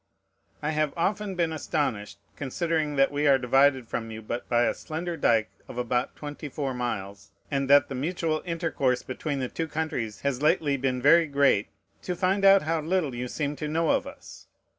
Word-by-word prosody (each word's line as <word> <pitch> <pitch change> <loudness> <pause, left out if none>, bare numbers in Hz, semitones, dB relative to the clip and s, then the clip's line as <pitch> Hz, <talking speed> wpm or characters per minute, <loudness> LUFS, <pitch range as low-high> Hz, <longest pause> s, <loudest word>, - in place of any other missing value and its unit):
I 150 - 0
have 155 -1 0
often 195 +3 -1
been 170 -2 0
astonished, 145 -11 -2 0.2
considering 155 +1 -1
that 135 0 +3
we 145 +1 +1
are 135 -1 +6
divided 130 0 +3
from 115 0 -4
you 110 0 -8
but 120 +3 -5
by 120 0 +3
a - - +2
slender 170 +2 -5
dike 115 -7 +2 0.2
of - - -9
about 125 0 -1
twenty 150 0 -7
four 135 -1 -3
miles, 105 -5 -4 0.2
and 135 -1 -1
that 145 0 +6
the - - -6
mutual 155 +3 -1
intercourse 160 -7 -1
between 140 +2 -4
the 130 - -1
two 165 +5 -4
countries 150 -9 -3
has 140 -2 -1
lately 150 -2 +2
been 130 -2 -1
very 165 +3 +6
great, 140 -8 +3 0.3
to 180 - -3
find 195 +2 +1
how 175 -5 +5
little 160 -3 0
you 125 +1 -4
seem 145 +3 -3
to 150 - -4
know 160 +1 +1
of - - 0
us. - - -12
145 Hz, 185 wpm, -27 LUFS, 125-160 Hz, 0.3 s, are